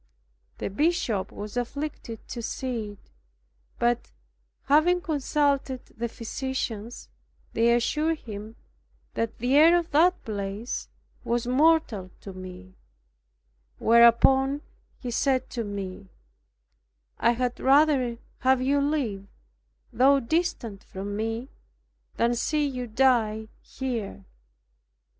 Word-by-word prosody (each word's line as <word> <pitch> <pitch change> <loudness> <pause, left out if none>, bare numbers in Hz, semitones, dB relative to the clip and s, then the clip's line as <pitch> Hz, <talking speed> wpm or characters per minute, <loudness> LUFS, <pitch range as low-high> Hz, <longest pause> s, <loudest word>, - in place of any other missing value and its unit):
The - - -4
Bishop 245 - 0
was 210 +2 -7
afflicted 245 -2 -5
to 235 - -5
see 230 -3 -4
it, 205 - -23 0.7
but, 240 0 0 0.5
having 310 +5 +4
consulted 285 -4 0
the 235 +1 -2
physicians, 230 -1 -4 0.5
they 230 +1 +3
assured 305 +7 +1
him 215 -3 -8 0.6
that 230 -1 -2
the 250 +4 +1
air 325 +4 +7
of 340 -1 -3
the 325 +5 +6
place 205 +2 -4 0.3
was 235 0 -1
mortal 255 - +2
to 195 - -8
me, 185 0 -10 1.0
whereupon 265 +5 +5 0.3
he 245 - -5
said 260 +1 +1
to 235 - -3
me, 195 -2 -6 1.1
"I 235 - +4
had 245 0 -2
rather 270 -3 +4 0.2
have 260 0 +3
you 280 +2 +2
live, 255 -10 -1 0.7
though 275 +3 +5
distant 255 - -2
from 200 +2 -6
me, 225 +3 -3 0.7
than 235 +1 +2
see 295 +5 0
you 250 -3 -3
die 220 -3 +2
here." 225 - -5
240 Hz, 105 wpm, -26 LUFS, 220-280 Hz, 1.1 s, air